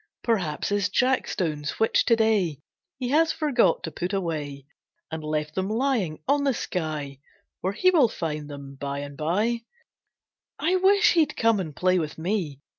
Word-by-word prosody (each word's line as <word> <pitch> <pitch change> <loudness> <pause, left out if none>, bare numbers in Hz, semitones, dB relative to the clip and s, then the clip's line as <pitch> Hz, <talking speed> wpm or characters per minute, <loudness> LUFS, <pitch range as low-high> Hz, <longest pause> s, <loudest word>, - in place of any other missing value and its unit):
Perhaps 185 -10 0
his 205 -1 +1
jackstones 180 - 0
which 225 - +3
to 230 - +5
day 210 -9 +1 0.4
He 255 -2 -3
has 320 +4 +4
forgot 290 -11 +2
to 160 - -4
put 180 +5 -4
away, 150 -7 -3 0.5
And 160 -1 -5
left 150 0 -2
them 190 +3 -2
lying 220 - 0
on 285 0 +3
the 275 -3 +1
sky 155 -8 -4 0.4
Where 190 +2 -2
he 370 - +3
will 295 -10 +5
find 150 -6 -4
them 140 -1 -8
bye 140 +1 -4
and 145 0 -8
bye. 205 +10 0 1.0
I 360 +4 +2
wish 400 +3 +5
he'd 315 -4 +2
come 225 -3 +3
and 160 -6 -5
play 185 0 +2
with 155 -2 -4
me. 165 -5 -2
185 Hz, 165 wpm, -25 LUFS, 150-240 Hz, 1.0 s, to